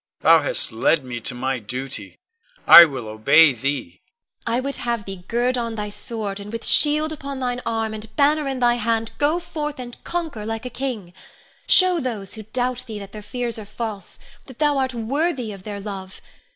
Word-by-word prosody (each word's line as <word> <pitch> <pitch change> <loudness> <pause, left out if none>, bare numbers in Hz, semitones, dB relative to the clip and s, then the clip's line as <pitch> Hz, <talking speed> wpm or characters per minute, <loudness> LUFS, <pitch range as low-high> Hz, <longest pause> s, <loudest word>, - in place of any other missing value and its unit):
Thou - - +6
hast - - 0
led 155 -5 +2
me 120 -1 -5
to 125 +2 -2
my 130 +1 -1
duty; 130 +5 -6 0.5
I 170 - +12
will 130 -7 -6
obey 140 +8 +5
thee. 125 -8 -3 0.5
Ione. 230 +1 +1
I - - +1
would 275 +2 -3
have 235 -3 -2
thee 195 -2 -8
gird 245 +2 +1
on 230 -1 -3
thy 210 -1 -4
sword, 205 -1 -5
and 200 +1 -8
with 230 0 -5
shield 305 +1 +3
upon 280 -2 -6
thine 250 -1 -2
arm, 225 -1 -1
and 220 0 -9
banner 295 +1 +3
in 265 -1 -2
thy 240 0 +4
hand, 225 0 0
go 300 +4 +2
forth 300 -4 -5
and 245 -1 -9
conquer 325 -11 -4
like 225 +2 -4
a 250 - -5
king. 230 -10 -4 0.5
Show 370 -2 +5
those 220 - -4
who 220 - -7
doubt 250 +3 -2
thee 220 -2 -6
that 200 -1 -9
their 215 - -8
fears 235 +1 -4
are - - -7
false, 215 -2 -6 0.3
that 260 -3 -12
thou 295 -2 +2
art 260 -2 -1
worthy 255 +1 -1
of 195 -2 -9
their 205 -1 -5
love. 195 -2 -7
225 Hz, 200 wpm, -22 LUFS, 195-260 Hz, 0.5 s, I